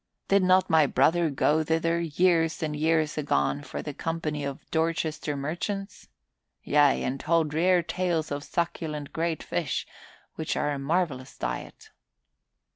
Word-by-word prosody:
"Did 200 0 +5
not 185 0 +4
my 160 -3 +4
brother 170 +2 +3
go 150 +2 +2
thither, 165 +2 +1
years 165 0 +2
and 150 -1 -2
years 155 0 +1
agone, 140 - 0
for 145 - -6
the 150 - -5
company 155 -1 -3
of 140 -1 -6
Dorchester 160 -2 -1
merchants? 185 +7 -4 0.6
Yea, 145 -1 +3
and 135 +2 -2
told 160 -1 +1
rare 175 +2 +3
tales 170 -3 -1
of 145 0 -3
succulent 155 -4 -3
great 165 -1 -1
fish, - - -2 0.5
which - - -3
are 150 - 0
a 140 - -3
marvelous 140 -3 -1
diet." - - -5
160 Hz, 140 wpm, -27 LUFS, 145-170 Hz, 0.6 s, Did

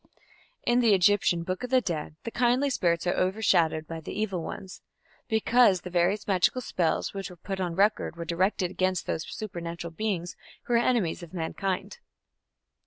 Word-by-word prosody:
In 240 +1 +3
the 225 -4 +5
Egyptian 180 -2 +3
Book 185 +6 -3
of 250 - -3
the 260 0 +5
Dead 155 -9 -4
the 230 - -5
kindly 250 +4 +2
spirits 170 -8 +1
are 175 - +2
overshadowed 180 -5 +2
by 165 0 -6
the 160 - -6
evil 195 -5 -1
ones, 190 +3 -7 0.5
because 220 -3 +4
the 180 - -8
various 180 +4 +1
magical 195 +6 +2
spells 175 -8 -1
which 195 -1 -5
were 180 - -11
put 190 +3 -5
on 175 -3 -2
record 205 -2 +2
were 170 0 -6
directed 180 +2 0
against 185 -1 0
those 160 - -3
supernatural 170 -4 -6
beings 175 -2 -3 0.3
who 240 - -2
were 235 - +5
enemies 235 -10 +1
of 175 +1 -10
mankind. 185 +3 -3
185 Hz, 175 wpm, -27 LUFS, 170-215 Hz, 0.5 s, the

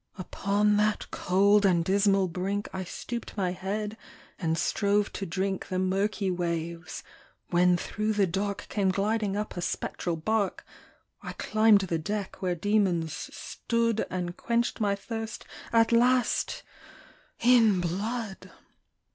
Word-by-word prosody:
Upon 205 +3 +1
that 210 0 0
cold 200 +3 +3
and 175 -4 +3
dismal 195 0 +3
brink 195 +4 -2
I 190 - -3
stooped 235 +5 -6
my 185 -3 0
head 210 +4 -4 0.4
and 165 -2 0
strove 205 +2 +1
to 195 - -4
drink 190 +3 -2
The 185 - -2
murky 195 +1 0
waves, 170 -1 -3 0.5
when 180 0 +4
through 215 +4 -2
the 205 -2 +3
dark 195 +3 -2
Came 200 -3 0
gliding 205 +1 0
up 210 +1 -4
a 175 - -3
spectral 175 0 -2
bark; 200 +5 -1 0.6
I - - -6
climbed 215 -1 +4
the 170 -4 -1
deck, 200 +4 -4
where 180 -2 0
demons 180 -4 +1 0.2
stood, 230 -2 -1
And 175 -1 -3
quenched 235 +2 -1
my 200 -1 +2
thirst 225 +2 -6 0.3
at 230 0 +4
last, 245 +1 +2 0.8
in 230 -5 +5
blood! 200 +4 -3
200 Hz, 130 wpm, -28 LUFS, 180-215 Hz, 0.8 s, in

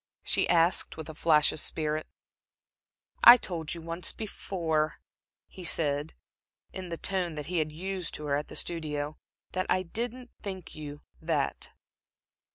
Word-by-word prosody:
she - - +3
asked, 170 0 +3
with 160 -1 -6
a - - -6
flash 150 -1 +4
of - - -6
spirit. 155 0 -1 1.2
"I 240 - +12
told 170 -7 -3
you 170 - -8
once 165 +1 -2
before," 165 -7 -1 0.5
he 185 - -11
said, 150 -2 +1 0.6
in 185 -2 -6
the 170 - -4
tone 185 -3 -1
that 150 -1 -5
he 175 +2 0
had 155 -1 0
used 185 +2 -3
to 150 - -6
her 140 -1 +1
at 145 +1 -2
the - - -10
studio 150 -3 -2 0.3
"that 185 0 -1
I 185 - +3
didn't 240 +7 -4
think 190 -3 -6
you 145 -1 -8 0.2
that." 160 -3 -1
165 Hz, 155 wpm, -29 LUFS, 150-185 Hz, 1.2 s, I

